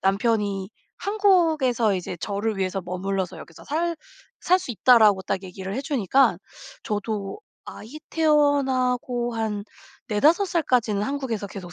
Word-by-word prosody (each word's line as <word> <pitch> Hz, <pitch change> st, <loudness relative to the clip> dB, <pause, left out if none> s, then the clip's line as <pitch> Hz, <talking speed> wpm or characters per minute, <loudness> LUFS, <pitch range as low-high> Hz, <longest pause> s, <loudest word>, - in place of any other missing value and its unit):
남편이 200 Hz, -1 st, 0 dB, 0.3 s
한국에서 325 Hz, -, +2 dB
이제 180 Hz, -1 st, -4 dB
저를 205 Hz, +1 st, -2 dB
위해서 190 Hz, 0 st, -1 dB
"머물러서 190 Hz, +1 st, -3 dB
여기서 165 Hz, -, -13 dB
살 335 Hz, +3 st, -1 dB, 0.5 s
살 365 Hz, +1 st, +4 dB
수 265 Hz, -, -7 dB
있다."라고 215 Hz, -4 st, +5 dB
딱 190 Hz, -, -3 dB
얘기를 190 Hz, +1 st, -7 dB
해주니까 270 Hz, -, +2 dB, 0.4 s
저도 210 Hz, -, -4 dB, 0.2 s
아이 250 Hz, +9 st, -10 dB
태어나고 265 Hz, -5 st, +1 dB
한 210 Hz, -2 st, -2 dB, 0.4 s
4-5 310 Hz, -, +3 dB
살까지는 250 Hz, -, +1 dB
한국에서 240 Hz, -5 st, -3 dB
계속 185 Hz, -3 st, -9 dB
225 Hz, 280 characters per minute, -24 LUFS, 195-285 Hz, 0.5 s, 있다."라고